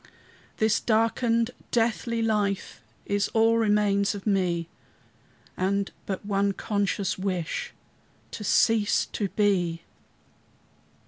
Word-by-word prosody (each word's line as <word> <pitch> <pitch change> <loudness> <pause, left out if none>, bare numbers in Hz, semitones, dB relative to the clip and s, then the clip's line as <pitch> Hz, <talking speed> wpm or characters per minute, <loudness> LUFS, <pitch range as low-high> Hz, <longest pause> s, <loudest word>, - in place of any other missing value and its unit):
This 220 -1 +2
darkened, 230 +1 +1 0.2
deathly 230 0 0
life 210 -3 -1 0.2
Is 205 0 0
all 225 +1 +4
remains 205 -2 +2
of 200 - -8
me, 180 -5 0 0.9
And 195 +1 0 0.2
but 195 0 -4
one 200 -1 +1
conscious 200 -2 -1
wish, 185 -4 -3 0.6
To 210 - -6
cease 210 +1 +3
to 205 - -1
be! 180 -6 +1
205 Hz, 100 wpm, -26 LUFS, 195-225 Hz, 0.9 s, all